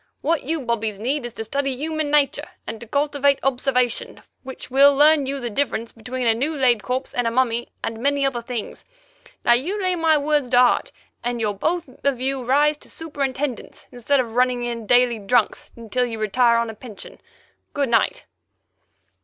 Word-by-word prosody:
What 325 +1 +1
you 315 +3 -2
bobbies 225 -4 -2
need 250 +4 -2
is 240 - -11
to 225 - -4
study 275 +3 -2
human 310 +1 -2
nature 290 -2 +2 0.2
and 225 0 -7
cultivate 285 0 +2
observation, 250 -2 0 0.2
which 260 -1 -9
will 280 +2 +6
learn 295 -1 +5
you 275 +1 -3
the 240 -2 -4
difference 235 -2 -1
between 250 +2 -5
a 225 - +4
new 280 +8 -2
laid 250 -6 +3
corpse 255 +4 -3
and 245 -1 0
a - - +3
mummy, 235 -1 0
and 225 0 -4
many 280 +1 +1
other 255 -3 -1
things. 235 -2 -6 0.6
Now 240 - +6
you 335 +13 0
lay 370 -2 +1
my 325 -2 +3
words 295 -3 0
to 245 - +3
heart, 250 0 +4 0.3
and 240 0 -2
you'll 215 -2 0
both 330 - -1 0.2
of 280 -3 +1
you 265 0 -2
rise 290 +4 +3
to - - -16
superintendents, 280 -4 -4
instead 250 +3 +1
of 235 -3 -2
running 250 0 +1
in 235 -2 -4
daily 245 -1 +3
'drunks' 215 +2 0
until 235 +2 -2
you 225 -2 -5
retire 235 +3 +3
on 230 -1 -1
a - - -11
pension. 215 -1 -11 0.6
Good 280 -3 0
night." 230 -1 +1
255 Hz, 185 wpm, -22 LUFS, 235-285 Hz, 0.6 s, will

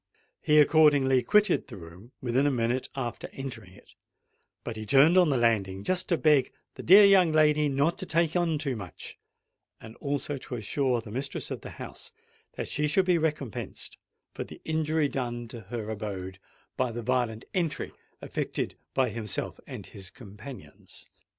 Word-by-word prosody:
He 150 - +3
accordingly 145 -4 +5
quitted 210 - +3
the 120 -7 -9
room 90 +7 -13
within 130 +3 +2
a - - +4
minute 120 0 -1
after 120 -4 -4
entering 120 -8 -7
it; - - -19 0.7
but 115 - -5
he 110 - -6
turned 140 - +5
on 180 -3 +5
the 135 - +2
landing 100 -5 +1
just 185 - -1
to 170 - +3
beg 150 -5 +3 0.2
"the - - -8
dear 200 +4 +8
young 190 -4 +6
lady 150 -1 +4
not 140 +5 +1
to 185 - -6
take 165 0 +1
on 170 -3 +1
too 140 -3 -2
much," 100 -5 -8 0.6
and 110 0 -12
also 145 0 -2
to 130 - -7
assure 125 +2 0
the 110 -2 -11
mistress 135 +5 -5
of - - -4
the - - -8
house - - -8 0.4
that - - -4
she 150 0 0
should 185 +5 +2
be 180 -2 +3
recompensed 150 -8 -4 0.3
for - - -4
the - - -12
injury 160 -1 +1
done 120 -3 -4
to 120 - -8
her 110 -2 -4
abode 95 -3 -5 0.4
by 130 -2 0
the 120 +1 -5
violent 120 -2 -1
entry 170 -5 -1 0.3
effected - - -3 0.2
by 130 -2 +2
himself 110 -2 -4
and - - -8
his 95 -2 -9
companions. 110 +4 -12
130 Hz, 170 wpm, -28 LUFS, 115-155 Hz, 0.7 s, dear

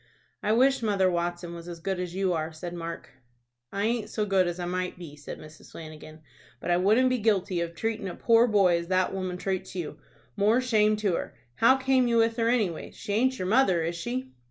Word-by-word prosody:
"I 210 - 0
wish 265 +3 +3
Mother 200 -4 +2
Watson 175 0 -3
was 170 0 -9
as 170 -1 -7
good 190 +2 -3
as 180 -1 -4
you 190 -1 +1
are," 160 -1 -2
said 170 +2 -7
Mark. 170 -1 -7 0.6
"I 200 - -2
aint 225 -2 -1
so 215 -1 -1
good 190 -3 +2
as 175 +1 -4
I 175 - -3
might 180 +1 -3
be," 165 -5 -10
said 145 0 -8
Mrs. 155 0 -14
Flanagan; 155 -1 -10 0.4
"but 175 - -3
I 175 - +4
wouldn't 220 +8 +3
be 255 - +1
guilty 195 -5 +1
of 170 0 -4
tratin' 220 0 -2
a 180 - -6
poor 230 +1 +4
boy 195 -6 +4
as 170 - -7
that 185 +1 +1
woman 185 -2 -3
trates 190 0 -3
you, 155 -4 -5 0.4
more 215 +5 +3
shame 215 -4 +3
to 210 -3 0
her! - - -4 0.2
How 245 +4 +5
came 265 -1 +2
you 235 -1 +2
with 225 0 +2
her 230 0 +2
any 225 -7 +2
way? 160 - -8
She 205 - -6
aint 260 +4 +2
your 185 - -3
mother, 195 -6 +3
is 170 +1 -2
she." 130 -5 -4
185 Hz, 230 wpm, -27 LUFS, 170-225 Hz, 0.6 s, How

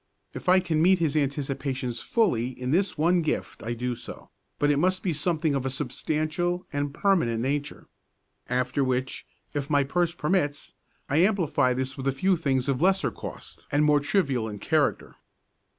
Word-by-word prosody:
If - - -4
I 185 +1 +7
can 165 -4 0
meet 185 +3 +5
his 160 -4 0
anticipations 135 -4 -2
fully 130 - 0
in 125 +1 -2
this 185 +3 +1
one 170 +3 +3
gift 155 - -3
I 115 +2 -3
do 125 +1 -2
so; - - -10 0.3
but 145 0 +2
it 145 - +2
must 185 +3 +1
be 180 - 0
something 155 0 0
of 135 -2 -1
a 135 - -1
substantial 155 +6 -2
and 145 0 -1
permanent 140 - +1
nature. 145 +3 -2 0.6
After 125 +2 0
which, 130 0 -2 0.3
if 145 0 -3
my 145 -2 +3
purse 170 +4 0
permits, 150 -4 -1 0.3
I 145 - 0
amplify 165 -9 +2
this 130 +1 -3
with 135 0 -4
a - - +3
few 185 +8 +2
things 135 -5 0
of 135 -1 0
lesser 190 +2 +3
cost - - -9
and 145 +1 +3
more 150 -1 +5
trivial 140 - 0
in 105 - -6
character. - - 0
145 Hz, 175 wpm, -26 LUFS, 130-175 Hz, 0.6 s, I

